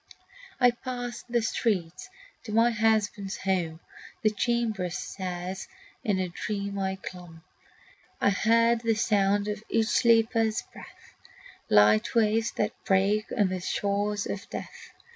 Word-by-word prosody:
I 245 Hz, -1 st, +6 dB
passed 245 Hz, 0 st, -6 dB
the 235 Hz, -1 st, +1 dB
streets 205 Hz, -, -1 dB, 0.4 s
to 215 Hz, -, -6 dB
my 230 Hz, +2 st, +4 dB
husband's 215 Hz, -3 st, 0 dB
home; 175 Hz, -4 st, -1 dB, 0.4 s
The 215 Hz, -, +4 dB
chamber 220 Hz, -4 st, 0 dB
stairs 180 Hz, +1 st, -5 dB, 0.4 s
in 205 Hz, -3 st, +1 dB
a 185 Hz, -1 st, -1 dB
dream 200 Hz, +2 st, -4 dB
I 190 Hz, 0 st, -1 dB
clomb. 175 Hz, -4 st, -10 dB, 0.8 s
I 200 Hz, -, +3 dB
heard 230 Hz, +3 st, +3 dB
the 230 Hz, -1 st, +1 dB
sound 205 Hz, -2 st, +2 dB
of 210 Hz, 0 st, -4 dB
each 225 Hz, -1 st, +2 dB
sleeper's 225 Hz, -2 st, +3 dB
breath, -, -, -14 dB, 0.6 s
Light 105 Hz, -, +4 dB
waves 225 Hz, 0 st, +3 dB
that 210 Hz, +1 st, 0 dB
break 200 Hz, +3 st, +2 dB
on 205 Hz, -4 st, +3 dB
the 185 Hz, 0 st, -2 dB
shores 205 Hz, +3 st, -1 dB
of 200 Hz, -, -5 dB
death. -, -, -8 dB
210 Hz, 130 wpm, -27 LUFS, 190-225 Hz, 0.8 s, I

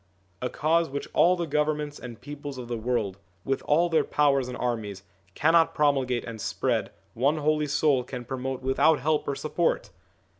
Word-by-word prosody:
A 125 Hz, -, -1 dB
Cause 165 Hz, +4 st, +1 dB
which 140 Hz, +1 st, -4 dB
all 180 Hz, +2 st, +5 dB
the 175 Hz, -1 st, -2 dB
governments 150 Hz, -1 st, -1 dB
and 120 Hz, -2 st, -9 dB
peoples 145 Hz, 0 st, -7 dB
of 125 Hz, -1 st, -7 dB
the 120 Hz, -, -3 dB
world, 110 Hz, -4 st, -2 dB, 0.3 s
with 135 Hz, 0 st, 0 dB
all 165 Hz, +4 st, +4 dB
their 165 Hz, -2 st, +2 dB
powers 140 Hz, -3 st, +2 dB
and 125 Hz, -, -6 dB
armies, 110 Hz, -6 st, -3 dB, 0.3 s
cannot 165 Hz, +2 st, +4 dB
promulgate 135 Hz, -5 st, +1 dB
and 115 Hz, -2 st, -7 dB
spread, -, -, -1 dB, 0.2 s
one 140 Hz, +6 st, +1 dB
Holy 150 Hz, 0 st, +1 dB
Soul 140 Hz, -2 st, +2 dB
can 125 Hz, 0 st, -7 dB
promote 130 Hz, +1 st, -4 dB
without 135 Hz, +4 st, +3 dB
help 150 Hz, +3 st, 0 dB
or 140 Hz, -, -1 dB
support 160 Hz, +4 st, -1 dB
140 Hz, 175 wpm, -27 LUFS, 125-150 Hz, 0.3 s, all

